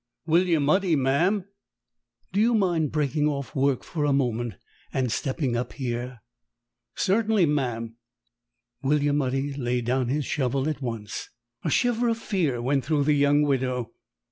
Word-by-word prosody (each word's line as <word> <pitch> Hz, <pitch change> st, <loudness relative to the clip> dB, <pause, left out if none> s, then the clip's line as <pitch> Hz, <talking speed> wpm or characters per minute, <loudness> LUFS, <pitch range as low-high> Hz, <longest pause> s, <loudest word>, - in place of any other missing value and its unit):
"William 165 Hz, -3 st, +3 dB
Udy, 180 Hz, +1 st, +3 dB
ma'am." 165 Hz, +9 st, +2 dB, 0.9 s
"Do 200 Hz, -, +2 dB
you 230 Hz, +1 st, +4 dB
mind 175 Hz, -8 st, +1 dB
breaking 150 Hz, 0 st, +1 dB
off 140 Hz, 0 st, -3 dB
work 135 Hz, -1 st, +1 dB
for 155 Hz, -3 st, -3 dB
a 145 Hz, -, +2 dB
moment 120 Hz, -4 st, 0 dB, 0.4 s
and 130 Hz, -3 st, 0 dB
stepping 130 Hz, 0 st, -1 dB
up 120 Hz, +1 st, -3 dB
here?" 125 Hz, -2 st, -4 dB, 0.7 s
"Cert'nly, 210 Hz, -1 st, +2 dB
ma'am." 120 Hz, -6 st, -2 dB, 0.8 s
William 145 Hz, +1 st, +2 dB
Udy 135 Hz, +2 st, -1 dB
laid 125 Hz, -3 st, -1 dB
down 130 Hz, +1 st, +1 dB
his 140 Hz, +3 st, -1 dB
shovel 135 Hz, 0 st, 0 dB
at 155 Hz, -2 st, -3 dB
once. 115 Hz, -5 st, -5 dB, 0.3 s
A 160 Hz, -, 0 dB
shiver 240 Hz, -, +2 dB
of 230 Hz, -, 0 dB
fear 175 Hz, -, -1 dB
went 135 Hz, +1 st, +1 dB
through 150 Hz, +2 st, +1 dB
the 150 Hz, +1 st, +3 dB
young 145 Hz, +1 st, +4 dB
widow. 125 Hz, -4 st, 0 dB
140 Hz, 145 wpm, -26 LUFS, 125-160 Hz, 0.9 s, you